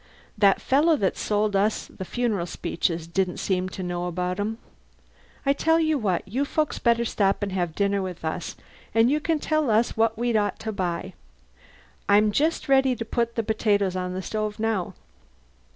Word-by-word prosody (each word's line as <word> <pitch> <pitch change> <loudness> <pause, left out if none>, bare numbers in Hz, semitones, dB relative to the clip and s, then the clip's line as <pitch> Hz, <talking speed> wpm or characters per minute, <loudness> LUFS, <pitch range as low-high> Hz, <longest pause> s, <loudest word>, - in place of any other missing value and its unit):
That 200 -2 +4
fellow 305 +5 +3
that 195 -10 0
sold 210 -1 0
us 205 +2 +1
the 190 - -9
funeral 215 -6 -1
speeches 165 0 -2
didn't 180 +2 -1
seem 185 -1 -1
to 185 - -6
know 175 0 -3
about 180 +2 -2
'em. 215 +2 -2 0.9
I 275 - +4
tell 325 +3 +2
you 315 -3 +1
what, 195 -5 -1
you 250 +8 -1
folks 305 +1 -1
better 235 -1 +2
stop 200 -2 +1
and 200 - -2
have 175 -3 -2
dinner 200 -1 +1
with 180 -3 -6
us 160 +2 -3 0.4
and 225 +3 +5
you 300 - +2
can 320 +1 0
tell 310 -2 0
us 220 +2 +2
what 225 0 +2
we'd 240 0 0
ought 205 -1 +1
to 220 - -3
buy. 185 -1 -3 1.0
I'm 210 +1 +5
just 310 +9 0
ready 265 -2 +4
to 230 - -5
put 235 +1 -1
the 230 - 0
potatoes 205 -3 +1
on 180 0 -3
the 185 - -4
stove 215 0 -3
now." 220 -5 -1
210 Hz, 185 wpm, -25 LUFS, 185-235 Hz, 1.0 s, and